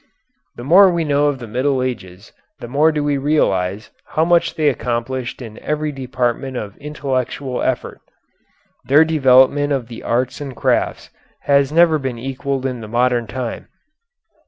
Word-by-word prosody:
The 120 Hz, -, -9 dB
more 185 Hz, +8 st, +7 dB
we 170 Hz, -2 st, 0 dB
know 145 Hz, -1 st, +2 dB
of 145 Hz, -2 st, 0 dB
the 125 Hz, -, -8 dB
Middle 130 Hz, +4 st, 0 dB
Ages 100 Hz, -5 st, -6 dB, 0.3 s
the 120 Hz, -, -8 dB
more 145 Hz, +6 st, +3 dB
do 150 Hz, -1 st, -2 dB
we 145 Hz, -1 st, 0 dB
realize 105 Hz, -9 st, 0 dB
how 160 Hz, -, 0 dB
much 170 Hz, 0 st, +2 dB
they 155 Hz, -2 st, +1 dB
accomplished 125 Hz, 0 st, -2 dB
in 110 Hz, -2 st, -10 dB
every 150 Hz, 0 st, -2 dB
department 130 Hz, -1 st, -3 dB
of 100 Hz, -4 st, -6 dB
intellectual 135 Hz, -3 st, -3 dB
effort. -, -, -2 dB, 0.8 s
Their 145 Hz, +4 st, +5 dB
development 145 Hz, -1 st, +4 dB
of 125 Hz, -4 st, -3 dB
the 115 Hz, -, -9 dB
arts 125 Hz, +4 st, -1 dB
and 135 Hz, -3 st, -6 dB
crafts -, -, -1 dB, 0.3 s
has 140 Hz, -1 st, +2 dB
never 165 Hz, -1 st, +4 dB
been 130 Hz, -3 st, -4 dB
equalled 135 Hz, +2 st, -4 dB
in 125 Hz, -3 st, -3 dB
the 110 Hz, -, -8 dB
modern 120 Hz, +1 st, +1 dB
time. 120 Hz, +2 st, -5 dB
130 Hz, 155 wpm, -19 LUFS, 120-145 Hz, 0.8 s, more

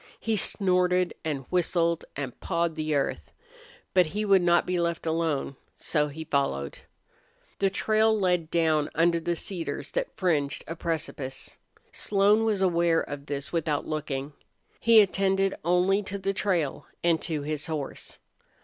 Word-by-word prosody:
He 225 Hz, -1 st, -1 dB
snorted 180 Hz, -3 st, +2 dB
and 145 Hz, -4 st, -3 dB
whistled 170 Hz, -2 st, +1 dB
and 135 Hz, -3 st, -5 dB
pawed 170 Hz, -2 st, -1 dB
the 155 Hz, -1 st, -2 dB
earth. 140 Hz, -, -2 dB, 0.6 s
But 180 Hz, -3 st, +5 dB
he 210 Hz, +6 st, -3 dB
would 195 Hz, -2 st, +5 dB
not 175 Hz, 0 st, +3 dB
be 180 Hz, -1 st, -1 dB
left 170 Hz, -1 st, -1 dB
alone, 160 Hz, -4 st, -1 dB, 0.2 s
so 150 Hz, -2 st, 0 dB
he 155 Hz, +2 st, -7 dB
followed. 70 Hz, -, -1 dB, 0.8 s
The 195 Hz, -, +3 dB
trail 215 Hz, +2 st, +2 dB
led 180 Hz, -4 st, +1 dB
down 160 Hz, -3 st, +2 dB
under 170 Hz, +1 st, +2 dB
cedars 170 Hz, -1 st, -5 dB
that -, -, -3 dB
fringed 150 Hz, -7 st, 0 dB
a 165 Hz, -, -5 dB
precipice. 155 Hz, -5 st, -4 dB, 0.4 s
Slone 210 Hz, +2 st, +3 dB
was 205 Hz, -3 st, +1 dB
aware 170 Hz, -2 st, +3 dB
of 145 Hz, 0 st, -7 dB
this 140 Hz, +2 st, -5 dB
without 155 Hz, -3 st, 0 dB
looking. 150 Hz, -2 st, -4 dB, 0.5 s
He 230 Hz, -2 st, +7 dB
attended 195 Hz, -1 st, +1 dB
only 180 Hz, +4 st, +3 dB
to 200 Hz, 0 st, -5 dB
the 195 Hz, 0 st, -1 dB
trail 180 Hz, -8 st, -1 dB, 0.2 s
and 170 Hz, -2 st, +2 dB
to 155 Hz, -4 st, -3 dB
his 150 Hz, 0 st, -1 dB
horse. 155 Hz, -4 st, -5 dB
170 Hz, 145 wpm, -27 LUFS, 155-190 Hz, 0.8 s, He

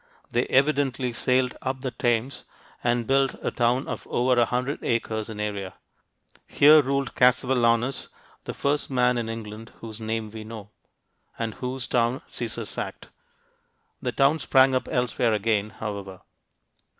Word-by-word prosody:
They 120 Hz, -, +1 dB
evidently 135 Hz, -3 st, +1 dB
sailed 125 Hz, +1 st, +1 dB
up 130 Hz, 0 st, -3 dB
the 130 Hz, -2 st, -3 dB
Thames 120 Hz, +2 st, -1 dB, 0.4 s
and 120 Hz, -1 st, +1 dB
built 135 Hz, +1 st, +2 dB
a -, -, -1 dB
town 120 Hz, +3 st, +1 dB
of -, -, -5 dB
over 125 Hz, 0 st, +2 dB
a -, -, +5 dB
hundred 125 Hz, +4 st, -2 dB
acres 110 Hz, -2 st, -1 dB
in 110 Hz, -2 st, -7 dB
area. 100 Hz, -3 st, -4 dB, 0.7 s
Here 150 Hz, +2 st, +7 dB
ruled 140 Hz, -1 st, -1 dB
Cassivellaunus, 125 Hz, 0 st, +2 dB, 0.4 s
"the -, -, -5 dB
first 145 Hz, +1 st, 0 dB
man 125 Hz, -2 st, +2 dB
in 115 Hz, -1 st, -3 dB
England 110 Hz, 0 st, -7 dB
whose 110 Hz, -1 st, -8 dB
name 110 Hz, -1 st, -3 dB
we 110 Hz, 0 st, -8 dB
know," 110 Hz, -2 st, -9 dB, 0.7 s
and 115 Hz, -2 st, -3 dB
whose 125 Hz, 0 st, -5 dB
town 120 Hz, +2 st, +1 dB
Caesar -, -, -4 dB
sacked. -, -, -6 dB, 0.9 s
The -, -, -1 dB
town 140 Hz, +3 st, +3 dB
sprang 135 Hz, -2 st, +4 dB
up 130 Hz, -, 0 dB
elsewhere 125 Hz, -2 st, +1 dB
again, 105 Hz, 0 st, +1 dB
however. 100 Hz, -4 st, -6 dB
120 Hz, 145 wpm, -25 LUFS, 110-130 Hz, 0.9 s, Here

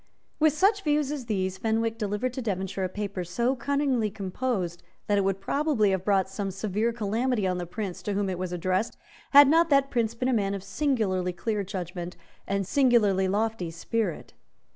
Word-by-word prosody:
With 310 Hz, -1 st, +4 dB
such 400 Hz, +6 st, +3 dB
views 295 Hz, -2 st, +1 dB
as 275 Hz, -5 st, -5 dB
these 190 Hz, -3 st, -1 dB
Fenwick 225 Hz, 0 st, 0 dB
delivered 210 Hz, +4 st, -1 dB
to 260 Hz, -, -4 dB
Devonshire 195 Hz, -3 st, -2 dB
a -, -, -3 dB
paper 200 Hz, -1 st, -4 dB
so 235 Hz, +9 st, 0 dB
cunningly 265 Hz, -3 st, 0 dB
composed 190 Hz, -3 st, -3 dB, 0.2 s
that 205 Hz, -1 st, +2 dB
it -, -, +2 dB
would 195 Hz, 0 st, 0 dB
probably 260 Hz, -2 st, +1 dB
have 190 Hz, -1 st, -1 dB
brought 195 Hz, -2 st, +2 dB
some 195 Hz, +1 st, -4 dB
severe 210 Hz, +4 st, -1 dB
calamity 230 Hz, 0 st, 0 dB
on 180 Hz, -1 st, 0 dB
the 175 Hz, -, -4 dB
Prince 195 Hz, 0 st, -5 dB
to 205 Hz, -, -3 dB
whom 200 Hz, 0 st, 0 dB
it 185 Hz, -2 st, -3 dB
was 185 Hz, -1 st, -3 dB
addressed, 185 Hz, +5 st, -1 dB, 0.3 s
had 285 Hz, 0 st, +9 dB
not 330 Hz, +3 st, +4 dB
that 275 Hz, -1 st, +3 dB
Prince 230 Hz, -2 st, 0 dB
been 250 Hz, +2 st, -1 dB
a 260 Hz, -, +2 dB
man 200 Hz, -3 st, +1 dB
of 195 Hz, -, -6 dB
singularly 195 Hz, -6 st, 0 dB
clear 210 Hz, +3 st, -2 dB
judgment 180 Hz, -2 st, -6 dB, 0.3 s
and 200 Hz, 0 st, 0 dB
singularly 215 Hz, -7 st, +3 dB
lofty 210 Hz, -2 st, -1 dB
spirit. 180 Hz, +2 st, -3 dB
210 Hz, 185 wpm, -27 LUFS, 190-245 Hz, 0.3 s, had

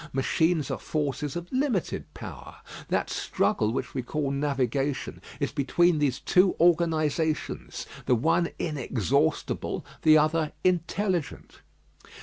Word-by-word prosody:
Machines 155 Hz, +3 st, +1 dB
are -, -, -3 dB
forces 145 Hz, -2 st, -2 dB
of 175 Hz, 0 st, -4 dB
limited 255 Hz, -, -1 dB
power. -, -, -9 dB, 0.3 s
That -, -, 0 dB
struggle 105 Hz, 0 st, 0 dB
which 130 Hz, +1 st, -3 dB
we 130 Hz, -, -1 dB
call 140 Hz, +3 st, -2 dB
navigation 140 Hz, -1 st, -1 dB, 0.2 s
is -, -, -1 dB
between 155 Hz, +3 st, +2 dB
these 140 Hz, -4 st, +1 dB
two 185 Hz, 0 st, +3 dB
organisations, 160 Hz, -2 st, +1 dB, 0.2 s
the 125 Hz, -, +5 dB
one 165 Hz, +7 st, +2 dB
inexhaustible, 140 Hz, -, -1 dB, 0.2 s
the 155 Hz, 0 st, +7 dB
other 155 Hz, 0 st, +1 dB
intelligent. 180 Hz, -1 st, -1 dB
155 Hz, 115 wpm, -27 LUFS, 140-170 Hz, 0.3 s, the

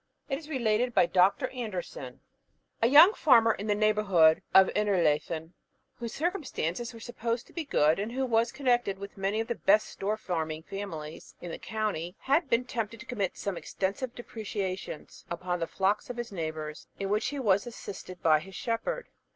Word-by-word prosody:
It 270 Hz, 0 st, -1 dB
is 310 Hz, -1 st, -13 dB
related 245 Hz, -3 st, +1 dB
by -, -, +6 dB
Dr. 190 Hz, +9 st, +3 dB
Anderson: 185 Hz, -, -6 dB, 0.6 s
A 230 Hz, -, +5 dB
young 305 Hz, -, +9 dB
farmer 230 Hz, -, +5 dB
in 205 Hz, -, -6 dB
the 205 Hz, -, +2 dB
neighbourhood 205 Hz, -7 st, +4 dB
of 190 Hz, 0 st, +7 dB
Innerleithen, 165 Hz, -5 st, +1 dB, 0.5 s
whose 235 Hz, -2 st, -4 dB
circumstances 260 Hz, -, -2 dB
were 230 Hz, -, -11 dB
supposed 230 Hz, 0 st, -3 dB
to -, -, -20 dB
be 335 Hz, -2 st, -4 dB
good, 155 Hz, -, +3 dB
and 210 Hz, +3 st, -3 dB
who 265 Hz, +2 st, -1 dB
was 230 Hz, -1 st, +2 dB
connected 240 Hz, -7 st, +1 dB
with 200 Hz, +1 st, -9 dB
many 195 Hz, +2 st, -1 dB
of 225 Hz, -, -4 dB
the 235 Hz, -, 0 dB
best 215 Hz, -1 st, +3 dB
store 210 Hz, +2 st, -2 dB
farming 160 Hz, -6 st, -3 dB
families 165 Hz, -6 st, -7 dB
in 175 Hz, -, -7 dB
the -, -, -6 dB
county, 210 Hz, -6 st, -3 dB
had 285 Hz, +2 st, +2 dB
been 235 Hz, +2 st, +2 dB
tempted 230 Hz, -2 st, -4 dB
to 245 Hz, -, -10 dB
commit 205 Hz, -8 st, -2 dB
some 200 Hz, -3 st, -3 dB
extensive 205 Hz, +10 st, -3 dB
depredations 200 Hz, -8 st, -5 dB
upon 180 Hz, +1 st, -2 dB
the 165 Hz, -, -2 dB
flocks 200 Hz, +4 st, 0 dB
of 245 Hz, -, -5 dB
his 240 Hz, -2 st, -4 dB
neighbours, 155 Hz, -4 st, -5 dB
in 195 Hz, -1 st, -2 dB
which 215 Hz, +1 st, +1 dB
he 285 Hz, -, -3 dB
was 210 Hz, -4 st, +2 dB
assisted 185 Hz, -5 st, -8 dB
by 155 Hz, -2 st, +5 dB
his 190 Hz, +5 st, -11 dB
shepherd. 275 Hz, -, -2 dB
210 Hz, 180 wpm, -29 LUFS, 180-240 Hz, 0.6 s, young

